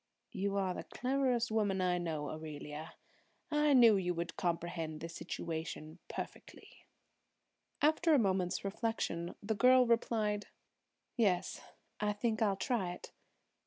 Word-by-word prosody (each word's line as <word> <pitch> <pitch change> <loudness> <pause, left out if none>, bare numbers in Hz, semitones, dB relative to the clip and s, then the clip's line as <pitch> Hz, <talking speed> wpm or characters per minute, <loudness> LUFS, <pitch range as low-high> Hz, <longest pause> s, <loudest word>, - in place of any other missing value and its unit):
"You 200 -2 -1
are 190 -2 +1
the - - -5
cleverest 255 -3 0
woman 205 -3 +1
I 180 -1 +2
know, 155 -4 -3
Aurelia. 155 0 -7 0.6
I 300 -1 +4
knew 235 -5 +7
you 180 -2 -1
would 170 0 -4
comprehend 170 -2 -2
the 165 - -5
situation 165 -1 -5
perfectly." - - -9 1.0
After 315 +1 +4
a - - +6
moment's 190 -4 +1
reflection 195 -5 -2
the 220 +2 0
girl 255 +3 +6
replied: 220 -3 +1 0.7
"Yes, 190 -6 +1 0.4
I 210 0 +1
think 220 +1 -1
I'll 200 -3 +2
try 195 -7 -1
it. - - -11
195 Hz, 125 wpm, -34 LUFS, 170-230 Hz, 1.0 s, knew